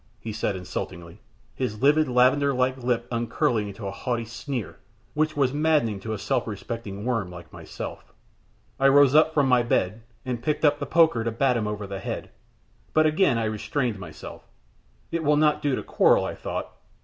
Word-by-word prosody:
he 110 - -6
said, 105 -2 -1
insultingly, 90 0 -6 0.3
his 120 -3 -4
lividly 150 -1 +4
lavender 135 +3 +3
like 130 +1 +1
lip 120 -2 -1
upcurling 115 -2 0
into 100 +1 -8
a 100 - -3
haughty 120 +2 -3
sneer, 120 0 -5 0.3
which 155 0 0
was 135 -2 +2
maddening 145 -9 +1
to 110 +3 -6
a 110 - -2
self 125 +4 -1
respecting 105 -1 -6
worm 115 -7 -1
like 85 -1 -11
myself. - - -8 0.7
I 135 - +5
rose 140 -1 +6
up 155 +1 +5
from 145 -3 +2
my 125 -1 +4
bed, 110 -2 0 0.2
and 125 -2 -3
picked 150 +3 0
up 145 0 +3
the - - -4
poker 160 -9 +4
to 115 - 0
bat 125 +3 +1
him 110 -3 -1
over 105 -1 -4
the 100 0 -6
head, - - -5 0.6
but 155 0 +5
again 155 -4 +3
I 115 - 0
restrained 110 +1 -2
myself. 90 - -10 0.6
It 165 -1 -2
will 150 0 +3
not 150 0 +3
do 145 -3 +1
to - - -4
quarrel, - - +3
I - - -3
thought. - - -5
120 Hz, 185 wpm, -25 LUFS, 105-145 Hz, 0.7 s, rose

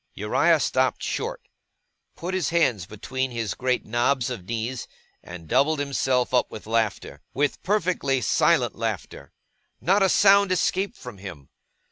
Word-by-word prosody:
Uriah - - +2
stopped - - 0
short, - - -3 0.7
put 180 +3 -5
his 185 -7 0
hands 125 - +1
between 130 +5 -3
his 115 -3 -3
great 125 -1 -1
knobs 120 +3 0
of 105 -8 -6
knees, 115 +3 -4 0.3
and 85 -2 -10
doubled 155 - +2
himself 135 -3 0
up 125 - +2
with 110 - -9
laughter. 110 -2 -2
With 145 +1 0
perfectly 180 -9 0
silent - - +2
laughter. - - -5 0.5
Not 195 +3 +2
a 195 - +4
sound 200 0 +5
escaped 190 +2 0
from 125 -6 -10
him. 85 -9 -10
130 Hz, 140 wpm, -24 LUFS, 115-175 Hz, 0.7 s, sound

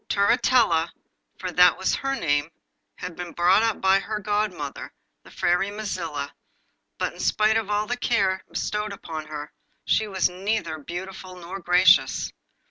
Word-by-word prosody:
Turritella, 200 -5 +3 0.5
for 185 - -4
that 180 -1 +5
was 190 - 0
her 270 0 -1
name, 145 - 0 0.5
had 180 -2 -7
been 175 0 -7
brought 180 +4 +4
up 225 -1 0
by 190 0 +4
her 215 +2 -4
godmother, 205 -8 -2 0.3
the - - -17
Fairy 180 +3 +1
Mazilla, 170 -9 -4 0.7
but - - -2
in - - -15
spite 215 +1 +2
of 225 -2 0
all 210 0 +1
the 245 +2 -3
care 195 -6 +1
bestowed 210 0 -3
upon 160 -5 -7
her, 150 -1 -7 0.3
she 220 - +2
was 190 -3 +1
neither 180 -3 -2
beautiful 185 +4 -7
nor 180 +2 -7
gracious. 180 +1 +4
190 Hz, 150 wpm, -24 LUFS, 170-210 Hz, 0.7 s, that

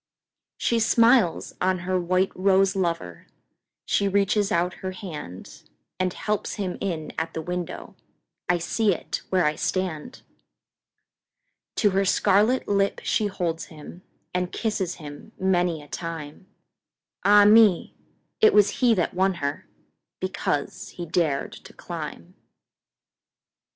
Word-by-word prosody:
She 235 - +1
smiles 230 -4 +3
on 185 0 +2
her 185 0 +1
white 185 +2 +1
rose 195 +1 +3
lover, 165 - -3 0.6
She 200 - +1
reaches 200 +1 +1
out 175 +2 +1
her 185 0 -4
handAnd 165 - -7
helps 210 -1 -2
him 195 -4 -4
in 165 -6 -3
at 165 0 -4
the 160 - -2
window—I 180 0 -5
see 205 +5 +1
it - - -5
where 185 -3 +2
I 150 - +2
stand! 185 +6 -3 1.5
To 205 -3 +3
her 195 +1 +2
scarlet 205 +6 +3
lip 200 -1 +1
she 215 - +1
holds 175 -4 -3
him, 160 +3 -12 0.3
And 180 0 -1
kisses 205 -6 -2
him 150 +7 -11
many 175 -4 +1
a - - -15
time—Ah, 165 +5 -1
me! 210 -3 +5 0.5
it 435 - +5
was 205 -1 +5
he 240 -3 +5
that 175 - 0
won 190 +1 +1
herBecause 175 +3 -5
he 175 - -6
dared 155 -4 0
to - - -13
climb! - - -7
185 Hz, 120 wpm, -25 LUFS, 170-200 Hz, 1.5 s, me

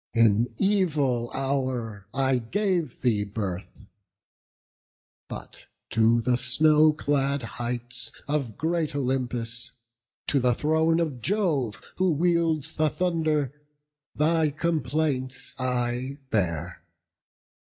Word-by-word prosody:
in 115 0 +4
evil 150 - +1
hour 130 -7 -2
I 135 -1 +2
gave 175 - -1
thee 110 -5 +2
birth! 100 -1 -5 1.4
But - - -9 0.2
to 115 +1 +4
the 125 +1 +2
snow 155 +5 +5
clad 140 -2 0
heights 120 +2 -4 0.2
Of 140 -7 -1
great 160 0 -1
Olympus, 125 -3 -2 0.5
to 140 - +2
the 125 -2 +2
throne 160 +3 +2
of 150 -8 -2
Jove, 155 - 0 0.2
Who 185 -2 +3
wields 165 -2 +1
the 155 0 +3
thunder, 155 -6 0 0.6
thy 160 +1 +3
complaints 145 -4 -1
I 125 +1 -1
bear. 85 -5 -1
135 Hz, 100 wpm, -26 LUFS, 120-155 Hz, 1.4 s, snow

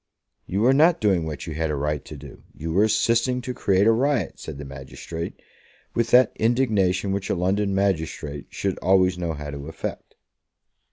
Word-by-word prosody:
"You 100 +3 -1
were 125 +4 +5
not 160 +5 +5
doing 95 -6 +2
what 75 - -5
you 80 - -5
had 80 +1 -1
a 75 - -1
right 75 0 -2
to 75 - -9
do. 70 0 -12
You 80 +1 -4
were 100 +5 +4
assisting 115 +3 +2
to 125 0 -4
create 100 -4 +2
a 115 - +6
riot," 125 - 0
said 75 -3 -7
the 70 - -7
magistrate, 70 +5 -7 0.5
with 115 -1 0
that 125 -1 +6
indignation 105 -6 +1
which 100 0 -2
a - - +1
London 95 +2 0
magistrate 80 -7 -2
should 95 -2 -3
always 95 -1 +3
know 85 -2 -2
how 75 -1 -6
to 70 0 -7
affect. 80 - -6
95 Hz, 185 wpm, -24 LUFS, 80-110 Hz, 0.5 s, a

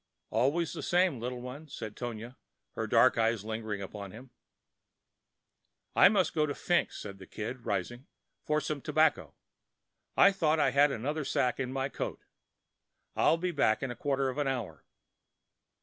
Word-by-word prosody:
"Always 145 +8 +1
the - - -5
same, 175 -7 +2
little 125 +1 -4
one," 135 +5 -8
said 110 -6 -7
Tonia, 120 0 -6 0.4
her - - -3
dark - - +4
eyes 115 -2 +1
lingering 110 -2 -4
upon 100 0 -7
him. 120 +6 -12 1.6
"I - - +8
must 190 -5 +2
go 155 - +1
over 150 -1 +1
to - - -14
Fink's," 175 -1 +1
said 100 -2 -8
the 95 - -11
Kid, 115 +3 -6
rising, 120 - -3 0.4
"for 150 0 +1
some 150 -2 -3
tobacco. - - +1 0.8
I 200 - +7
thought 160 -5 +1
I 140 -3 +3
had 140 +2 +4
another 145 +6 -2
sack 125 -1 0
in 130 -1 -2
my 135 0 -1
coat. - - -5 0.9
I'll 165 - +4
be 180 +1 -1
back 135 -8 +2
in 135 - -2
a - - -6
quarter 135 0 0
of 130 +3 -4
an 145 - 0
hour." 115 - -4
130 Hz, 165 wpm, -30 LUFS, 110-150 Hz, 1.6 s, I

